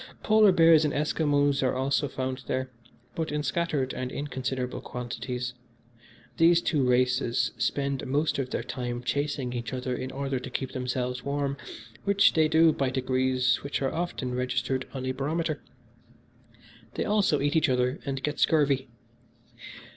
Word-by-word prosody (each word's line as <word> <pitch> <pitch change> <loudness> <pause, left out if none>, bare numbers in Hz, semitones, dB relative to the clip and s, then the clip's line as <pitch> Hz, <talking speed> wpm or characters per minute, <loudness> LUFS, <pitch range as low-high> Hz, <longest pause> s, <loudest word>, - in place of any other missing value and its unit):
Polar 215 -2 +6
bears 165 -3 +6
and 150 - 0
Esquimos 145 -1 +1
are 130 - +1
also 140 +3 +1
found 130 -1 -4
there, 130 0 -2 0.4
but 160 -2 -3
in 150 0 -1
scattered 145 -2 -1
and 130 0 -4
inconsiderable 130 -3 -3
quantities. 125 0 -5 0.8
These 170 +1 +5
two 145 -4 +1
races 125 -2 +2
spend 140 +3 -1
most 145 +3 0
of 130 -2 -2
their - - -2
time 120 -1 -4
chasing 140 -1 -1
each 120 +1 -4
other 130 0 -2
in 130 - -4
order 135 -1 -2
to 130 - -7
keep 130 0 -3
themselves 125 0 -3
warm, 140 0 -1 0.5
which 200 0 +4
they 160 -1 +4
do 160 0 +5
by 135 -2 0
degrees 130 -1 +1
which 140 - -3
are 135 - 0
often 160 -7 -3
registered 125 +1 -1
on 130 -1 -5
a 130 - 0
barometer. 150 +3 -2 1.3
They - - -1
also 205 -7 +2
eat 145 +3 0
each 160 -2 +3
other 125 +1 +1
and 135 -1 -4
get 150 0 -2
scurvy. 140 -4 +2
135 Hz, 155 wpm, -27 LUFS, 125-150 Hz, 1.3 s, Polar